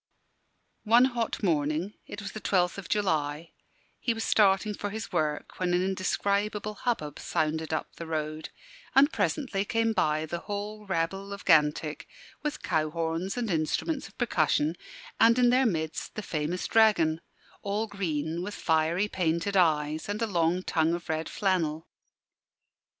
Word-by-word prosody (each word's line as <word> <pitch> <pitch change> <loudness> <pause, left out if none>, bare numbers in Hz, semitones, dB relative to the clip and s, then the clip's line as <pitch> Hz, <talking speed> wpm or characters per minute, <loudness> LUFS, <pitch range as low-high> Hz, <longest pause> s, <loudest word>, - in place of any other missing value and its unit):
One 235 +3 +6
hot 240 -4 -2
morning 160 +2 0
it 205 - -7
was 200 - -5
the 215 - -7
12th 180 -1 +1
of 190 - -9
July 160 -5 0 0.5
he 235 - 0
was 225 - -3
starting 205 0 +3
for 205 0 -4
his 220 +2 -6
work 150 -1 -2
when 180 -1 +1
an 180 - +2
indescribable 200 +2 -1
hubbub 195 - -3
sounded 160 +1 -1
up 155 - -3
the 165 - -6
road, 155 0 -3 0.5
and 280 +3 +6
presently 245 -10 0
came 225 +2 +1
by 155 -5 +1
the 170 +2 -4
whole 210 +1 -5
rabble 195 +3 -2
of 200 0 -7
Gantick 150 -2 +3 0.3
with 300 0 -4
cow 155 0 +1
horns 165 +5 -2
and 230 -4 -1
instruments 165 - -1
of - - -20
percussion, 155 - +1 0.4
and 230 +1 +6
in 245 -1 +5
their 255 0 +4
midst 160 -5 -3
the 215 - -4
famous 165 +1 -2
dragon 170 -8 +4 0.4
all 205 +2 -1
green, 170 -5 -2
with 205 +3 -5
fiery, 165 +5 +1
painted 175 +1 -1
eyes, 155 -2 +2
and 205 +1 -2
a 230 - +1
long 175 -2 +1
tongue 165 -1 +1
of 175 - -9
red 160 0 -1
flannel. 170 -5 0
180 Hz, 155 wpm, -28 LUFS, 160-210 Hz, 0.5 s, One